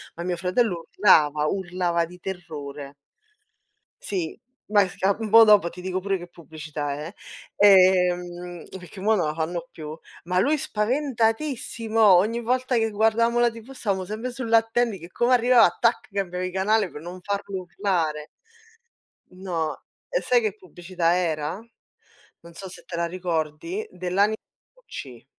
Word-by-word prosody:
ma 170 - -6
mio 180 -1 -1
fratello 180 -1 0
urlava, 150 -6 +4
urlava 180 -2 -1
di 180 +2 -14
terrore. 150 -6 -7 1.1
Sì, 180 -5 -3 0.3
beh 205 -2 +3
si - - -14
ca 195 +1 +2
un 220 -2 -3
po' 225 +1 +9
dopo 205 -5 +5
ti 180 +1 -11
dico 185 0 -2
pure 195 0 -1
che 175 0 -10
pubblicità 155 -3 -6
è. 155 +6 -7 0.4
Ehm, 180 -3 +3
perchè 180 +1 -12
mo' 220 +2 +3
non 170 -6 0
la 150 - -2
fanno 170 +1 -3
più, 155 0 -8 0.3
ma 180 +1 +1
lui 295 +9 +2
spaventatissimo, 230 -1 -1
ogni 210 +4 +5
volta 255 +2 0
che 225 0 +1
guardavamo 225 +3 +2
la 240 0 +4
TV 230 +3 -12
stavamo 195 -7 -2
sempre 225 +5 -5
sull'attendi 230 -3 +1
che 170 +2 -11
come 240 +6 +2
arrivava, 245 0 +5
tac, 235 0 +1
cambiavi 185 -2 -3
canale 200 +2 +1
per 150 - -9
non 180 +2 -8
farlo 200 -1 -3
urlare. 170 -5 -2 1.0
No. 175 -4 -3 0.3
E - - 0
sai 245 -1 +3
che 215 -2 -2
pubblicità 175 -2 -2
era? 160 -2 -1 0.9
Non 170 0 -14
so 190 +2 -9
se - - -12
te 170 - -7
la 170 0 0
ricordi, 175 - -3
dell'ani 195 +4 +1 0.4
wc. - - -10
185 Hz, 150 wpm, -24 LUFS, 170-225 Hz, 1.1 s, po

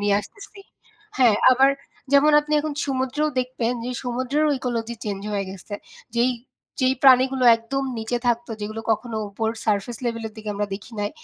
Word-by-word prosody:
নিয়ে 205 0 +2
আসতেছি। 400 - -13 0.6
হ্যাঁ, 235 -5 +5 0.2
আবার 265 +2 +5 0.4
যেমন 290 +2 +6
আপনি 300 +1 -6
এখন 300 -1 -4
সমুদ্রেও 270 +3 0
দেখবেন 250 -2 -2
যে 250 - -3
সমুদ্রেরও 260 +5 0
ইকোলজি 235 -2 -3
চেঞ্জ 200 -2 -3
হয়ে 200 -1 -1
গেছে। 195 +2 -8 0.4
যেই 245 +2 +3 0.5
যেই 260 0 +3
প্রাণীগুলো 260 -1 +5
একদম 270 +4 -3
নিচে 230 +2 -2
থাকতো 240 0 0
যেগুলো 215 +2 -4
কখনো 225 +1 -3
উপর 220 +2 -2 0.2
সারফেস 215 +2 0
লেভেলের 230 -2 -3
দিকে 215 -1 -5
আমরা 205 +1 -1
দেখি 215 +4 -10
নাই 205 +1 -1
240 Hz, 160 wpm, -23 LUFS, 220-265 Hz, 0.6 s, যেমন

